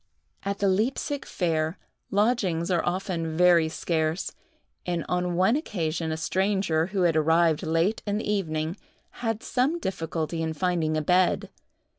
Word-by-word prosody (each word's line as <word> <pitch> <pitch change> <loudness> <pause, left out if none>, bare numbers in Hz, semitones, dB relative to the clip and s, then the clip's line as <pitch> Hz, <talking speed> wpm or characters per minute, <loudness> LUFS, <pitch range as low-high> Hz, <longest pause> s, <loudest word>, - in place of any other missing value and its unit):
At 200 0 -2
the 200 - +1
Leipsic 250 +8 0
fair, 160 -1 -1 0.3
lodgings 195 -5 +1
are 175 -2 +2
often 175 -3 -2
very 175 -2 +5
scarce, 160 +1 -1 0.5
and 175 -2 -2
on 180 -1 0
one 190 +7 +3
occasion 165 - -2
a 160 - -2
stranger, 190 -2 +1
who 190 -1 0
had 170 -2 +3
arrived 160 0 +3
late 165 +6 +1
in 205 0 0
the 220 - -4
evening, 165 -4 -1 0.4
had 225 -2 -1
some 270 +7 +1
difficulty 165 - -3
in 160 0 -1
finding 160 -2 0
a 155 - -1
bed. 180 +3 +2
175 Hz, 145 wpm, -26 LUFS, 160-200 Hz, 0.5 s, very